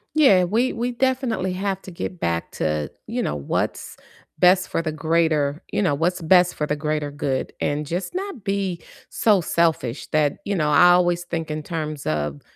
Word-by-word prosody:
Yeah, 200 Hz, -12 st, +6 dB
we 225 Hz, +8 st, +1 dB
we 240 Hz, +2 st, -2 dB
definitely 245 Hz, -7 st, 0 dB
have 195 Hz, 0 st, -2 dB
to 185 Hz, -, -9 dB
get 175 Hz, +1 st, -6 dB
back 85 Hz, 0 st, -2 dB
to, 75 Hz, -2 st, -2 dB, 0.2 s
you -, -, -2 dB
know, 75 Hz, -, -2 dB
what's 70 Hz, -, -3 dB, 0.4 s
best 180 Hz, +1 st, +4 dB
for -, -, -1 dB
the 155 Hz, -1 st, -3 dB
greater 155 Hz, -1 st, +1 dB
you -, -, 0 dB
know, 145 Hz, -7 st, +2 dB
what's 175 Hz, +4 st, 0 dB
best 180 Hz, +2 st, +4 dB
for 150 Hz, -, -1 dB
the 150 Hz, -, -1 dB
greater 150 Hz, -1 st, -2 dB
good, 135 Hz, -2 st, -2 dB
and 150 Hz, +1 st, -1 dB
just 180 Hz, -, -4 dB
not 380 Hz, -, -5 dB
be 195 Hz, -3 st, -2 dB, 0.3 s
so 205 Hz, -5 st, +3 dB
selfish 160 Hz, -7 st, 0 dB
that 150 Hz, -2 st, +1 dB
you 200 Hz, -, -1 dB
know, 150 Hz, -3 st, +1 dB
I 175 Hz, +3 st, +7 dB
always 175 Hz, -1 st, +3 dB
think 165 Hz, -3 st, -4 dB
in 155 Hz, 0 st, -3 dB
terms 155 Hz, -2 st, -5 dB
of 75 Hz, -2 st, -2 dB
170 Hz, 185 wpm, -23 LUFS, 150-190 Hz, 0.4 s, I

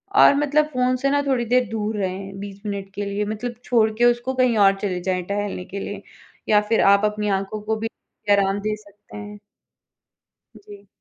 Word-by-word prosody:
और 285 Hz, -, +7 dB
मतलब 295 Hz, +1 st, +2 dB
फ़ोन 255 Hz, 0 st, +2 dB
से 275 Hz, +2 st, 0 dB
ना 285 Hz, 0 st, +2 dB
थोड़ी 250 Hz, -3 st, +1 dB
देर 250 Hz, +2 st, +2 dB
दूर 215 Hz, -1 st, -2 dB
रहें 195 Hz, 0 st, -4 dB
20 200 Hz, 0 st, -8 dB
मिनट 200 Hz, -1 st, -4 dB
के 205 Hz, 0 st, -3 dB
लिए 200 Hz, +1 st, -2 dB
मतलब 220 Hz, +3 st, -4 dB
छोड़ 225 Hz, -3 st, +3 dB
के 240 Hz, -, +4 dB
उसको 240 Hz, +2 st, +2 dB
कहीं 255 Hz, -3 st, +2 dB
और 195 Hz, 0 st, +5 dB
चले 185 Hz, -3 st, -1 dB
जाएँ 185 Hz, -1 st, -1 dB
टहलने 200 Hz, -3 st, -3 dB
के 195 Hz, +1 st, -6 dB
लिए 200 Hz, 0 st, -6 dB, 0.5 s
या 210 Hz, -1 st, +5 dB
फिर 225 Hz, -, +3 dB
आप 200 Hz, +1 st, +3 dB
अपनी 210 Hz, 0 st, -1 dB
आँखों 200 Hz, +2 st, -6 dB
को 220 Hz, +1 st, -1 dB
भी 225 Hz, +1 st, -3 dB, 0.4 s
आराम 200 Hz, 0 st, +3 dB
दे 215 Hz, +1 st, -2 dB
सकते 210 Hz, 0 st, -15 dB
हैं। 205 Hz, 0 st, -9 dB, 1.2 s
जी। 410 Hz, -1 st, -14 dB
210 Hz, 195 wpm, -22 LUFS, 200-240 Hz, 1.2 s, और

